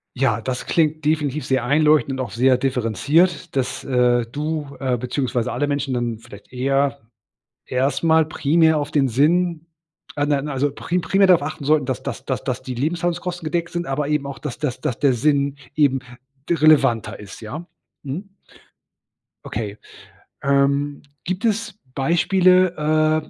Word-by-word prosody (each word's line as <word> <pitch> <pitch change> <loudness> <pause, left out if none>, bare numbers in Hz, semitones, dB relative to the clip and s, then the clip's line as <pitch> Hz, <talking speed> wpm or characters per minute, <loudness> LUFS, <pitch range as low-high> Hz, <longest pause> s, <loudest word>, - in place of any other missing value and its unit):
Ja, 120 -4 +1
das 125 +3 -4
klingt 155 -2 +1
definitiv 150 -3 0
sehr 130 -2 +1
einleuchtend 150 -1 +3
und 130 - -1
auch - - -10
sehr 130 +2 +3
differenziert, 135 - +1
dass, 130 -2 -2
äh, 125 -2 +2
du, 150 -1 -4
äh, 130 -2 0
beziehungsweise 125 -1 -2
alle 145 - -1
Menschen 140 -2 -1
dann 120 -2 -2
vielleicht 100 -1 -14
eher 135 +2 0 0.7
erst 135 +5 0
mal 160 -1 +5
primär 160 +1 +2
auf 145 0 -3
den 140 -3 +3
Sinn 165 +6 +1 0.5
äh, 145 0 +1
nein, 145 0 0
also 140 +1 0
pri 175 +4 -2
primär 195 +2 +3
darauf 180 -5 +5
achten 145 -1 -5
sollten, 150 -2 +2
dass 130 - -3
dass - - -6
dass - - -3
dass 130 0 -3
die 130 -1 -5
Lebenshaltungskosten 175 +4 -2
gedeckt 170 +2 -2
sind, 175 0 -3
aber 140 +2 -2
eben 150 -2 0
auch, 135 -3 -7
dass 145 -5 -6
dass 130 -4 -3
dass 120 - -2
der 140 -3 +3
Sinn 140 +2 +1 0.2
eben 135 -3 +3 0.5
de 170 - +2
relevanter 135 -7 +3
ist, 100 -3 -11
ja? 155 +11 -7 0.4
Mhm. 175 +9 -6 1.1
Okay. 105 -1 -5 0.7
Ähm, 140 +1 +1 0.2
gibt 185 +5 -3
es 220 -1 -1 0.2
Beispiele, 165 -1 +3
145 Hz, 155 wpm, -21 LUFS, 130-160 Hz, 1.1 s, mal